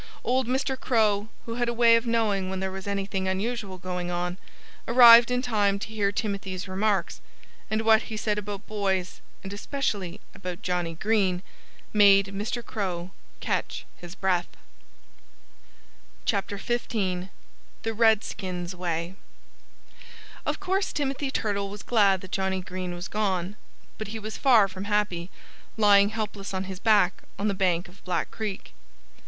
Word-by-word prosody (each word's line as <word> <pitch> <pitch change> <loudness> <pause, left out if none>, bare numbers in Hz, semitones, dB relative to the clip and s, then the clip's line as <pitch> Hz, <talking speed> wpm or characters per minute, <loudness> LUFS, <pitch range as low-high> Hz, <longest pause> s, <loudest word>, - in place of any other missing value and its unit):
Old 255 0 +1
Mr. 265 +1 0
Crow, 215 -4 +2 0.2
who 230 - -4
had 240 - +2
a 235 - -2
way 230 -1 +6
of 230 +1 +1
knowing 210 -5 +1
when 190 0 -3
there 190 0 -2
was 190 +1 -7
anything 195 -1 -2
unusual 200 0 -2
going 180 -1 -4
on, 180 +1 -2 0.5
arrived 235 0 +9
in 250 0 0
time 205 -5 +2
to 200 +1 -6
hear 210 -2 0
Timothy's 200 -3 -3
remarks. 195 -1 0 0.5
And 215 +1 0
what 220 0 +6
he 220 - -6
said 210 -1 0
about 205 0 -6
boys 190 -4 -2 0.2
and 195 +1 -6
especially 205 -5 -3
about 180 -2 -7
Johnnie 175 -2 -1
Green 190 -1 +1 0.5
made 200 -2 +6
Mr. 220 +4 -3
Crow 185 -4 -3 0.3
catch - - -2
his 175 +1 -10
breath. 185 -3 +1 1.8
XV 200 - +1 1.4
THE 225 - -1
REDSKINS' 200 -5 +1
WAY 170 -1 -3 1.3
Of - - -1
course 385 0 0
Timothy 275 -1 -2
Turtle 200 -6 -1
was 205 +1 -8
glad 200 -5 +3
that 185 - -11
Johnnie 190 -1 -1
Green 180 -1 -5
was 175 +1 -5
gone. 195 -3 -1 0.4
But 215 - -4
he 220 +2 -5
was 215 0 -6
far 235 -7 +5
from 190 +1 -7
happy, 205 -4 0 0.5
lying 205 -2 +6
helpless 210 -3 -4
on 190 - -1
his 190 -1 -7
back 205 -4 +3 0.2
on 205 - -1
the 205 - +1
bank 185 -1 +1
of 180 +3 -18
Black 180 - -2
Creek. 210 -3 -5
200 Hz, 150 wpm, -26 LUFS, 185-220 Hz, 1.8 s, arrived